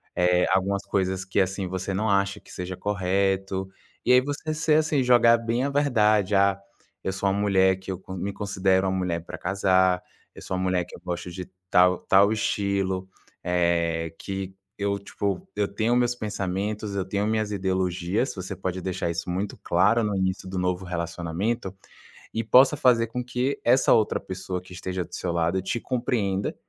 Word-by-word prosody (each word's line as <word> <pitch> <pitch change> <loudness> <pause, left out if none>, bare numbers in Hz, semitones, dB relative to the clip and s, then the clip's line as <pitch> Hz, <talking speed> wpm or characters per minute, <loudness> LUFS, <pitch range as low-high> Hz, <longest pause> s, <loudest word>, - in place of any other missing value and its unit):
eh, 90 0 +3
algumas 95 +1 +1
coisas 95 -1 -1
que, 95 - 0
assim, 95 0 0
você 95 +1 -3
não 110 +3 0
acha 100 0 +1
que - - -17
seja 90 0 -5
correto. 95 -1 0 0.4
E - - +4
aí 125 - +7
você 145 +3 -3
ser 155 0 +2
assim, 155 -3 +1
jogar 120 -1 +6
bem 115 +2 -1
a 140 - 0
verdade: 110 -8 +2
"Ah, 100 0 +3 0.4
eu 95 - -1
sou 100 +1 0
uma 100 - 0
mulher 95 -2 +3
que 95 0 -6
eu 90 - -5
me 95 +2 -3
considero 95 -1 +1
uma 95 - 0
mulher 85 -2 -1
pra - - -7
casar, 95 -1 +2 0.3
eu - - -11
sou 95 - -3
uma 95 - -1
mulher 90 -1 +1
que - - -12
eu - - -12
gosto 90 0 -4
de 90 +1 -6 0.2
tal 90 0 +4
tal 100 +2 +5
estilo. 100 -3 -1 0.4
Eh, 85 -2 0
que 95 -1 -5 0.2
eu, 100 0 0
tipo, 100 -2 -3
eu 105 - +1
tenho 110 +4 0
meus 120 0 +2
pensamentos, 105 -1 -3
eu 95 - -1
tenho 100 +2 -1
minhas 110 -1 0
ideologias", 95 +3 -1
você 95 +1 -5
pode 95 0 -4
deixar 90 -2 -2
isso 85 +1 -4
muito 95 +3 -3
claro 105 +7 +3
no 105 -2 -1
início 95 0 -1
do 95 - -4
novo 90 +1 -1
relacionamento 90 +5 -3 0.6
e 115 - -1
possa 130 +6 +6
fazer 120 -4 +4
com 125 +2 -4
que 125 +3 -2
essa 125 +3 +4
outra 110 -2 +2
pessoa 95 -1 -5
que 90 0 -14
esteja 95 0 -3
do - - -20
seu 90 - -2
lado 85 +2 0
te 95 +5 -2
compreenda, 115 -7 -1
95 Hz, 185 wpm, -25 LUFS, 95-105 Hz, 0.6 s, aí